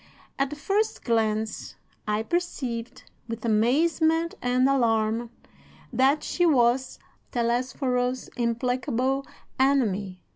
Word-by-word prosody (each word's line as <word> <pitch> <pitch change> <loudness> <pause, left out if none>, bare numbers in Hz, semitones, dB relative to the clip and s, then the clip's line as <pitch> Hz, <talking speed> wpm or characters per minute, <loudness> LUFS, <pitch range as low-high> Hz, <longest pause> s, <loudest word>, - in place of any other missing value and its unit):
"At 275 0 +1
the 295 - -6
first 395 +9 -1
glance 220 -2 -1 0.3
I 210 +1 0
perceived, 255 -6 -3 0.2
with 230 0 -5
amazement 320 +9 +2
and 250 +1 +2
alarm, 230 -3 +1 0.6
that 270 +5 +3
she 350 - -1
was 255 -5 +3 0.3
Telesforo's 250 +1 0
implacable 250 +2 -1 0.3
enemy. 210 -9 +1
250 Hz, 95 wpm, -26 LUFS, 230-275 Hz, 0.6 s, that